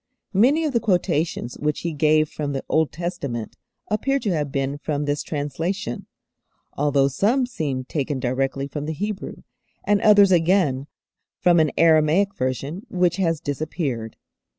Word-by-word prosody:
Many 260 +11 +4
of 295 - -1
the 235 - +3
quotations 175 - -1
which 150 0 -1
He 170 -1 -3
gave 155 +1 +3
from 145 -1 -4
the 135 - -3
Old 160 -1 +1
Testament 140 -8 -4 0.3
appear 270 +6 0
to 230 -7 -1
have 150 -4 -1
been 140 +1 -2
from 145 -1 -2
this 145 0 -1
translation, 155 +2 -3 0.7
although 140 -1 +2
some 220 - +1
seem 150 - -3
taken 140 -1 -2
directly 135 +2 -1
from 145 +1 -5
the 160 - -2
Hebrew, 205 +5 -5 0.4
and 205 -1 +2
others 205 -2 +6
again 165 -6 +2 0.5
from 175 -1 +4
an 155 -1 +3
Aramaic 165 +4 +4
version 135 - -3
which 180 -1 +1
has 165 -5 +1
disappeared. 140 - -3
155 Hz, 150 wpm, -23 LUFS, 140-190 Hz, 0.7 s, others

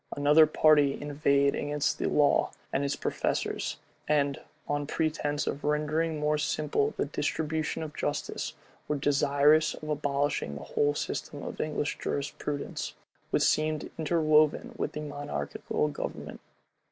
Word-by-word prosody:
Another 150 +2 +6
party 150 -2 +4
inveighed 140 -1 +2
against 145 0 -1
the - - 0
law 145 -1 +3 0.2
and 135 - +1
its 140 0 0
professors; - - -2 0.3
and, 145 -2 +2 0.3
on 145 0 -1
pretence 150 -2 -1
of 140 - -3
rendering 150 +2 0
more 150 0 +1
simple 290 - 0
the - - +1
distribution 160 0 -2
of 150 -1 -7
justice, 145 0 -3 0.3
were 150 - 0
desirous 145 +2 +3
of 155 - -9
abolishing 145 - -1
the 70 - -7
whole 145 0 +1
system - - -4
of - - -4
English 150 -1 -2
jurisprudence, 145 0 -3 0.3
which - - +2
seemed 155 0 +1
interwoven 155 -1 +3
with - - -3
monarchical 145 - -3
government. 70 - -6
150 Hz, 130 wpm, -29 LUFS, 145-155 Hz, 0.3 s, Another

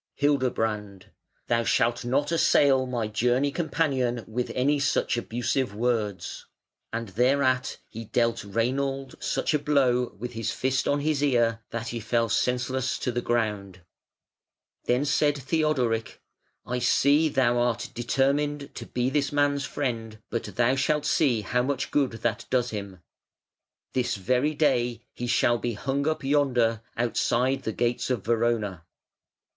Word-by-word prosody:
Hildebrand: 110 -8 -1 0.3
"Thou 115 0 +1
shalt 120 +1 +1
not 140 +5 0
assail 140 -5 +4
my 120 -3 -2
journey 125 +6 +1
companion 135 -8 -1
with 120 +2 -3
any 140 +3 +2
such 140 - +1
abusive 120 0 -1
words". 110 -4 -2 0.4
And 115 -1 -4
thereat 130 +4 +1
he 115 +1 -8
dealt 115 +1 0
Reinald 130 +6 -1
such - - 0
a 150 - +3
blow 130 -4 +1
with 120 +4 -6
his 115 -2 -3
fist 130 0 0
on 145 0 +1
his 150 -1 0
ear 120 -5 +2
that 115 -1 -4
he 115 - -4
fell 115 +1 0
senseless 125 +3 0
to 125 - -2
the 120 0 -2
ground. 105 -6 -2 1.0
Then 125 +4 +2
said 145 0 +2
Theodoric: 130 -6 0 0.5
"I 125 +1 -2
see 145 +5 +3
thou 120 -3 +2
art 120 -1 -1
determined 140 +4 0
to - - -8
be 125 +1 -1
this 145 -2 0
man's 145 -1 +1
friend; 115 -5 -3
but 115 - -2
thou 120 +2 +1
shalt 150 +2 +1
see 130 -8 +2
how 125 +5 0
much 140 +2 -2
good 140 -5 +1
that 110 -3 -1
does 125 -1 +1
him. 100 -4 -6 0.9
This 125 -1 0
very 125 +9 0
day 120 -6 +1
he 120 - -5
shall 120 0 +2
be 120 0 -2
hung 135 +7 -2
up 155 -1 -1
yonder 125 -6 +2 0.2
outside 125 +2 +1
the 110 - -3
gates 120 +3 -1
of 120 -7 -1
Verona". 110 -6 0
125 Hz, 145 wpm, -26 LUFS, 115-140 Hz, 1.0 s, assail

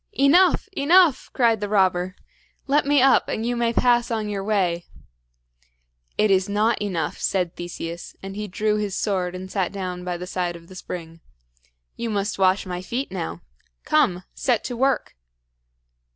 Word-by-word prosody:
"Enough! 350 +10 +4
enough!" 330 0 +4
cried 230 -4 +2
the 205 - -2
robber. 185 -2 +2 0.5
"Let 280 +1 +2
me 285 -2 +4
up, 270 - +4
and 220 - -2
you 245 +1 0
may 235 -1 +1
pass 240 0 +3
on 220 -3 -2
your 200 -2 -3
way." 185 -5 0 1.3
"It 215 -1 +3
is 190 +1 +2
not 210 +3 +1
enough," 185 -6 -2
said 180 -3 -1
Theseus; 170 -1 -7
and 195 0 -7
he 210 0 -4
drew 210 +3 0
his 205 -3 -2
sword 185 -3 -1
and 185 +1 -7
sat 190 -4 -1
down 185 -2 -5
by 180 -1 -3
the 180 - -6
side 180 -1 -2
of 170 0 -13
the 185 - -12
spring. 165 -2 -7 0.8
"You 235 - -3
must 205 -1 -2
wash 190 +1 +3
my 180 -1 -4
feet 245 +8 -4
now. - - -5 0.4
Come, 260 - +2
set 245 -5 0
to 245 - -4
work!" 265 +2 0
205 Hz, 165 wpm, -23 LUFS, 180-240 Hz, 1.3 s, Enough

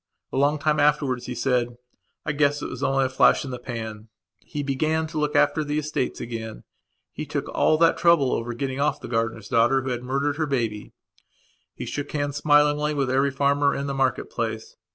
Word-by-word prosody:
A - - -1
long 145 +2 +3
time 150 +1 +1
afterwards 145 -4 +1
he 125 - -4
said: 120 -1 0 0.5
"I 150 - 0
guess 145 0 +1
it - - -4
was 125 - -7
only 135 -1 +2
a - - +2
flash 130 +2 +3
in 135 - -6
the 125 - -5
pan." 110 -3 -6 0.3
He 145 - -6
began 155 +4 0
to 155 -1 -4
look 150 0 -1
after 150 +2 +3
the 145 0 -2
estates 150 -4 -2
again; 115 -2 -6 0.5
he - - -5
took - - -3
all 155 - +2
that 165 +1 +3
trouble 170 -6 +4
over 120 +1 -3
getting 130 +2 -3
off 145 - +1
the - - -8
gardener's 115 -2 -2
daughter 120 +3 +3
who 130 - -3
had 120 -1 -2
murdered 140 +3 -1
her 155 -1 0
baby. 115 -6 -2 0.8
He - - -6
shook 145 0 -5
hands 145 -1 -2
smilingly 150 0 +3
with 135 -3 0
every 135 +2 +2
farmer 140 +1 +2
in 140 - -3
the 140 - -2
market 135 -2 0
place. 110 -1 -4
140 Hz, 205 wpm, -24 LUFS, 125-145 Hz, 0.8 s, trouble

